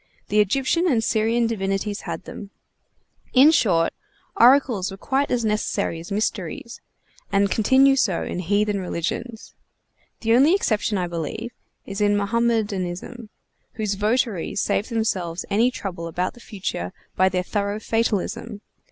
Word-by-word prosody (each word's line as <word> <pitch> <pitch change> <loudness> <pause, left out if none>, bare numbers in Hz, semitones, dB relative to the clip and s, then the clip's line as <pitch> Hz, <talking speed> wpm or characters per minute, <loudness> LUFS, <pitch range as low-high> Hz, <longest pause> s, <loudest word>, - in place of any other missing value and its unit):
The 210 - +3
Egyptian 270 - +2
and 240 -9 +2
Syrian 225 +2 +1
divinities 200 -1 -2
had 165 -1 -4
them; 200 - -9 0.8
in 270 +4 +7
short, 180 - +2 0.4
oracles 240 -5 +4
were 195 - -8
quite 270 +7 0
as 235 -2 0
necessary 210 -5 -1
as 170 +4 -10
mysteries, 210 +2 -3 0.5
and 200 -1 +2
continue 265 +5 +4
so 200 -9 +1
in - - -4
heathen 205 +3 +1
religions. 190 +6 -4 0.7
The 225 0 +2
only 280 +9 +5
exception, 215 - 0
I 180 - 0
believe, 175 +7 -5 0.3
is 195 +1 -5
in 205 0 +3
Mohammedanism, 215 -1 -1 0.4
whose 215 -2 -2
votaries 210 -2 0
save 205 - 0
themselves 185 -7 -2
any 225 +5 +4
trouble 180 -8 -6
about 180 +2 -2
the 240 - -16
future 190 - -5 0.2
by 185 0 +4
their 180 0 -1
thorough 205 +2 -2
fatalism. 220 -1 -2
210 Hz, 135 wpm, -23 LUFS, 190-235 Hz, 0.8 s, in